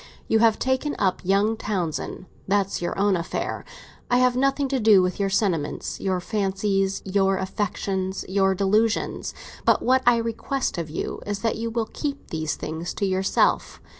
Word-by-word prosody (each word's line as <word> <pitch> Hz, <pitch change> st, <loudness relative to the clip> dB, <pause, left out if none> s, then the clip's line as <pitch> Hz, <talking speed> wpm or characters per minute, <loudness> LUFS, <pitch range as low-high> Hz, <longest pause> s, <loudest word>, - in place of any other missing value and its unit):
You 220 Hz, -, +3 dB
have 225 Hz, -1 st, +4 dB
taken 260 Hz, +3 st, 0 dB
up 190 Hz, -2 st, +1 dB
young 200 Hz, +4 st, +2 dB
Townsend; 185 Hz, -4 st, -3 dB, 0.2 s
that's 195 Hz, -1 st, +1 dB
your 175 Hz, -, -2 dB
own 200 Hz, 0 st, +3 dB
affair. 170 Hz, -1 st, -3 dB, 0.5 s
I 245 Hz, -, +4 dB
have 250 Hz, 0 st, +3 dB
nothing 275 Hz, +2 st, +1 dB
to 270 Hz, -1 st, 0 dB
do 210 Hz, -4 st, +6 dB
with 180 Hz, +1 st, -2 dB
your 200 Hz, -1 st, +1 dB
sentiments, 185 Hz, -7 st, -1 dB
your 185 Hz, -2 st, 0 dB
fancies, 195 Hz, 0 st, -1 dB
your 195 Hz, 0 st, +2 dB
affections, 190 Hz, 0 st, -2 dB
your 195 Hz, 0 st, +2 dB
delusions; 210 Hz, +4 st, +1 dB, 0.3 s
but -, -, +3 dB
what 260 Hz, +1 st, +4 dB
I 240 Hz, -1 st, +6 dB
request 230 Hz, 0 st, -2 dB
of 165 Hz, -2 st, -4 dB
you 155 Hz, -, -4 dB
is 205 Hz, -1 st, -3 dB
that 225 Hz, -, +1 dB
you 230 Hz, +1 st, -2 dB
will 230 Hz, 0 st, -1 dB
keep 285 Hz, -2 st, -4 dB
these 155 Hz, -1 st, -2 dB
things 165 Hz, +2 st, -5 dB
to 200 Hz, -, 0 dB
yourself. 190 Hz, 0 st, +1 dB
200 Hz, 165 wpm, -24 LUFS, 190-230 Hz, 0.5 s, do